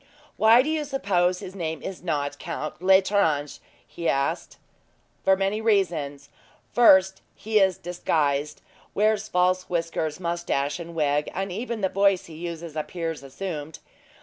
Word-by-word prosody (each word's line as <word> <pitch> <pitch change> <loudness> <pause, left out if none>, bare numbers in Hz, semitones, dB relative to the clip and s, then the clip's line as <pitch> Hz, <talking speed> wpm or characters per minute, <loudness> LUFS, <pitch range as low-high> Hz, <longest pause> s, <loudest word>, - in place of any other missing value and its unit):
"Why 225 +3 +6
do 300 - -2
you 315 -1 0
suppose 185 -10 0
his 185 - -8
name 160 -4 -4
is 190 - -6
not 145 -4 -2
Count 165 -1 -5
L'Estrange?" 190 -6 +2 0.3
he 170 - -3
asked. 140 0 -1 0.7
"For 190 0 +4
many 195 +3 -1
reasons. 165 -10 0 0.4
First 190 -5 +5
he 215 0 +1
is 190 -2 +3
disguised; 155 -5 -1 0.3
wears 215 0 +2
false 185 -1 +1
whiskers, 165 -2 -2
moustache, 170 -4 -2
and 170 0 -8
wig, 150 -1 +1
and 195 0 -2
even 230 +3 -4
the 190 - +2
voice 195 -1 +2
he 165 - -12
uses 170 -1 -7
appears 165 0 -4
assumed. 150 +2 -6
175 Hz, 140 wpm, -25 LUFS, 155-195 Hz, 0.7 s, Why